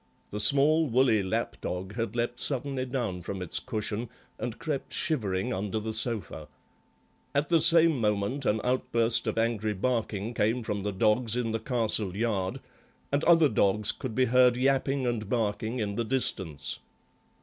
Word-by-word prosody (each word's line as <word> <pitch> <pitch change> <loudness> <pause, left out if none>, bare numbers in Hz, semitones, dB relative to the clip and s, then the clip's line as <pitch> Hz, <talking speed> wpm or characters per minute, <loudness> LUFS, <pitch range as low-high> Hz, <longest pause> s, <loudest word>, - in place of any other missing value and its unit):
The 105 - -4
small, 145 +7 +5
woolly 125 -3 +3
lapdog 95 0 -4
had 115 -1 -4
leapt 120 +1 -2
suddenly 135 -1 -2
down 120 -9 -3
from 95 +3 -5
its 90 -2 -1
cushion 110 -1 -4 0.3
and 120 -2 -4
crept 155 -4 -4
shivering 100 - 0
under 100 +3 -2
the 110 +1 -4
sofa. 110 -9 -1 0.9
At 145 +1 +1
the 165 -2 +4
same 165 -3 +7
moment 105 +6 -1
an 110 +1 +1
outburst 120 -2 +1
of - - -2
angry 110 -2 0
barking 110 0 -2
came 115 +3 0
from 105 -2 -3
the 105 +1 -2
dogs 110 +4 +1
in 120 -2 -1
the 115 - -2
castle 110 -5 -1
yard, 105 -5 -1 0.5
and 140 +2 0
other 165 -2 +6
dogs 105 -2 +1
could 125 -5 -7
be 130 - +3
heard 125 0 +4
yapping 135 +1 +1
and 115 -4 -2
barking 110 0 -1
in 105 -4 -2
the 115 - -1
distance. 95 - -2
115 Hz, 160 wpm, -28 LUFS, 105-130 Hz, 0.9 s, same